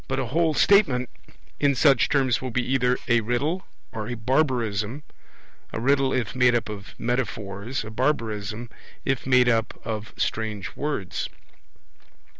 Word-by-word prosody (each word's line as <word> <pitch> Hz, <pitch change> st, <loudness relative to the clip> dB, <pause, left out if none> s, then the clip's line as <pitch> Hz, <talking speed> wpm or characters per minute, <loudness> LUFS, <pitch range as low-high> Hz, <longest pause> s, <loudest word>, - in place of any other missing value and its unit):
But 130 Hz, -, -1 dB
a 135 Hz, -, 0 dB
whole 160 Hz, +5 st, +1 dB
statement 135 Hz, -, +4 dB, 0.5 s
in 140 Hz, -1 st, +3 dB
such 135 Hz, +1 st, +4 dB
terms 135 Hz, -4 st, +2 dB
will 130 Hz, -, -3 dB
be 125 Hz, +1 st, -1 dB
either 125 Hz, -1 st, +2 dB
a 120 Hz, -1 st, +4 dB
riddle 145 Hz, -, -1 dB, 0.2 s
or 110 Hz, -1 st, -5 dB
a 120 Hz, -, -3 dB
barbarism, 120 Hz, -1 st, 0 dB, 0.7 s
a -, -, -3 dB
riddle, 135 Hz, +2 st, +3 dB
if 120 Hz, -6 st, -1 dB
made 125 Hz, -1 st, +4 dB
up 115 Hz, -, -1 dB
of 100 Hz, -1 st, -8 dB
metaphors, 115 Hz, -2 st, -2 dB
a 110 Hz, -, -8 dB
barbarism, 110 Hz, -3 st, -2 dB, 0.3 s
if 135 Hz, -1 st, -1 dB
made 125 Hz, -1 st, +5 dB
up 115 Hz, -2 st, +1 dB
of 110 Hz, -1 st, -5 dB
strange 110 Hz, -3 st, -2 dB
words. 145 Hz, -11 st, -3 dB
125 Hz, 145 wpm, -25 LUFS, 110-135 Hz, 0.7 s, made